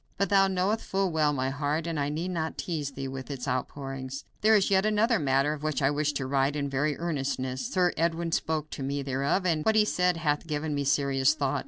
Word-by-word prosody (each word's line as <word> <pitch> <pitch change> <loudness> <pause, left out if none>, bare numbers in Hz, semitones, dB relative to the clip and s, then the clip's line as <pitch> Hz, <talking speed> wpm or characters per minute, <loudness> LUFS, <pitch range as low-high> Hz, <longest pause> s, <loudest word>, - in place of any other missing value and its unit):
But 200 - 0
thou 195 -1 +5
knowest 190 +4 0
full 195 -1 0
well 155 -2 +2
my 130 -2 -1
heart, 145 +3 -1
and 165 -3 -2
I 140 0 0
need 165 +5 -3
not 160 -2 -3
tease 150 -5 -3
thee 135 0 -5
with 130 0 -7
its 135 -2 -5
outpourings. 135 +1 -4 0.2
"There 220 +1 +5
is 200 -1 +2
yet 190 0 +4
another 215 +1 +2
matter 135 0 +2
of 150 - -7
which 155 -1 -1
I 135 -1 +2
wish 150 0 0
to 135 -1 -2
write 135 +1 +1
in 140 -2 -2
very 145 +2 0
earnestness. 135 - -2
Sir 180 -2 +2
Edwin 165 0 0
spoke 155 -1 -1
to - - -6
me 140 +1 -2
thereof, 140 +7 0
and 160 -4 +1
what 220 - +2
he 215 -1 +5
said 180 -4 +1
hath 150 0 -1
given 150 0 -2
me 145 -1 -1
serious 140 0 +2
thought. 140 -3 0
150 Hz, 230 wpm, -28 LUFS, 140-170 Hz, 0.2 s, thou